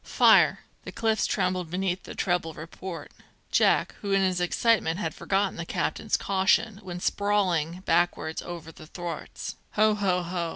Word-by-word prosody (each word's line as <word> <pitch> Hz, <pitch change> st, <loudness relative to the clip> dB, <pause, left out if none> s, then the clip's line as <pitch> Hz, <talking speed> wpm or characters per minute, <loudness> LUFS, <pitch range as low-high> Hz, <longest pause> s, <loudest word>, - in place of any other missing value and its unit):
"Fire!" -, -, +5 dB, 0.2 s
The -, -, -7 dB
cliffs 220 Hz, -1 st, +1 dB
trembled 185 Hz, -3 st, -1 dB
beneath 185 Hz, +1 st, -2 dB
the -, -, -8 dB
treble 175 Hz, -4 st, -1 dB
report. 165 Hz, +2 st, -8 dB, 0.4 s
Jack, -, -, +3 dB
who 200 Hz, -, -3 dB
in 195 Hz, 0 st, +3 dB
his 185 Hz, -1 st, +1 dB
excitement 180 Hz, -2 st, +2 dB
had 210 Hz, -, -2 dB
forgotten 195 Hz, 0 st, -1 dB
the 170 Hz, -, -3 dB
captain's 215 Hz, -, -1 dB
caution, 200 Hz, +2 st, +1 dB
went 180 Hz, -2 st, -7 dB
sprawling 185 Hz, -5 st, 0 dB
backwards 175 Hz, -2 st, +1 dB
over 170 Hz, -2 st, -8 dB
the 155 Hz, -1 st, -14 dB
thwarts. 175 Hz, 0 st, -6 dB, 0.2 s
"Ho, 215 Hz, 0 st, +4 dB
ho, 190 Hz, -3 st, 0 dB
ho! 170 Hz, -1 st, -3 dB
185 Hz, 155 wpm, -27 LUFS, 170-200 Hz, 0.4 s, Fire